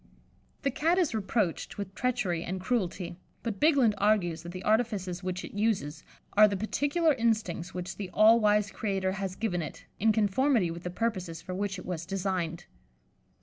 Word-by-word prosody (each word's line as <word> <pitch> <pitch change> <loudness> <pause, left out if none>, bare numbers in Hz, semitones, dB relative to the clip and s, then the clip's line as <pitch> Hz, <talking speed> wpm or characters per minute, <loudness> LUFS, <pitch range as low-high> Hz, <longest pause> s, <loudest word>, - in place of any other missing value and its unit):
The 275 - +1
Cat 325 +7 +2
is 350 -9 +2
reproached 210 -4 -1
with 200 -2 -5
treachery 210 -9 -1
and 185 +2 -4
cruelty, 180 -5 -2 0.2
but 225 -4 -3
Bigland 280 -8 +4
argues 190 -6 +2
that 170 +1 -8
the 185 +1 -7
artifices 210 -5 0
which 185 0 -3
it - - -11
uses 200 -8 -1 0.3
are 215 +1 +8
the 200 -1 -2
particular 290 - +1
instincts 215 -8 -1
which 180 0 -5
the 195 -3 -5
all 220 +4 +6
wise 210 -1 +3
Creator 195 -3 -1
has 190 -1 -4
given 185 -6 -1
it, 150 - -7
in 220 +2 +4
conformity 215 -1 +2
with 170 +1 -7
the 180 - -4
purposes 185 -4 -3
for 185 - -6
which 200 +1 -2
it - - -9
was 170 -2 -4
designed. 180 -3 -2
195 Hz, 175 wpm, -29 LUFS, 180-225 Hz, 0.3 s, are